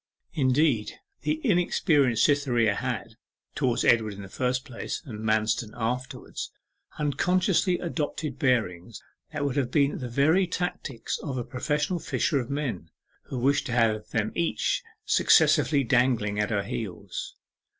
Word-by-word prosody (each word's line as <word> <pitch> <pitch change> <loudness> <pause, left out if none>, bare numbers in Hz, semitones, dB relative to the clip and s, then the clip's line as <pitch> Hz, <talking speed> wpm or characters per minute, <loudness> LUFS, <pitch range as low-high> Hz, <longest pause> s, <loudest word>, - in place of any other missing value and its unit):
Indeed, 130 -5 +2 0.3
the 310 - -1
inexperienced 160 - +3
Cytherea 125 -7 +2
had, 115 -1 -4 0.4
towards 130 -5 0
Edward 110 -3 +3
in 100 - -8
the 95 - -10
first 125 +4 -1
place, 125 +4 -5
and 110 -7 -7
Manston 110 0 0
afterwards, 125 +2 -4 0.5
unconsciously 180 +5 +2
adopted 155 -4 -3
bearings 115 - 0 0.3
that 150 -2 -2
would 140 0 -1
have 130 -4 +1
been 140 +1 +2
the 125 - -5
very 155 +9 +3
tactics 165 -9 -3
of 135 -4 -4
a 120 - -2
professional 150 +8 -1
fisher 150 -2 0
of 125 - -5
men 130 - -3 0.4
who 130 - -5
wished 140 +4 +2
to 120 - -3
have 110 -3 +1
them 110 -1 -1
each - - 0 0.2
successively 150 -2 +4
dangling 120 -5 +2
at 105 - +1
her 100 -2 0
heels. 100 -2 -5
130 Hz, 140 wpm, -27 LUFS, 115-150 Hz, 0.5 s, successively